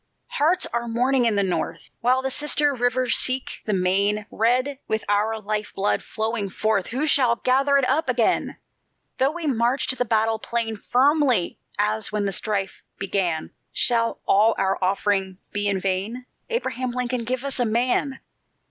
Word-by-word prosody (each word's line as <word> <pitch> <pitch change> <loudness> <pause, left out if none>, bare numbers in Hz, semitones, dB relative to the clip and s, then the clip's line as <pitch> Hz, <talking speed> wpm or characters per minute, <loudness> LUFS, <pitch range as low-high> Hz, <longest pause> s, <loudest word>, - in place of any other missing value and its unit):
"Hearts 335 +6 +2
are 235 0 -1
mourning 245 +2 +1
in 225 -2 +2
the 200 - +2
North, 185 -2 -3
While 255 +2 +2
the 265 - -1
sister 295 0 +1
rivers 245 0 +1
seek 255 0 +1
the 215 - -1
main, 200 +3 +1
Red 255 +5 +1
with 220 0 -2
our 210 +2 +1
life 210 0 -3
blood 200 +1 0
flowing 220 -2 -3
forth 215 0 0
Who 265 +6 -2
shall 255 -6 +4
gather 270 +3 +2
it 270 -2 +2
up 290 +2 +1
again? 240 -3 +1 0.6
Though 265 - +4
we 340 0 -6
march 250 -1 +1
to 255 - +3
the 250 - 0
battle 225 -1 +1
plain 230 -1 -2
Firmly 260 - +2 0.2
as 210 +1 0
when 210 -1 -1
the 195 - 0
strife 195 0 -2 0.2
began, 185 -5 -1 0.2
Shall 230 -1 +1
all 215 +3 +4
our 195 0 0
offering 190 0 0 0.2
be 205 0 +1
in 195 -1 0
vain? 195 +7 -2 0.2
Abraham 260 - -2
Lincoln, 250 0 -2
give 250 +2 -3
us 275 -1 -1
a 245 - +2
MAN! 250 +4 0
230 Hz, 165 wpm, -23 LUFS, 205-255 Hz, 0.6 s, shall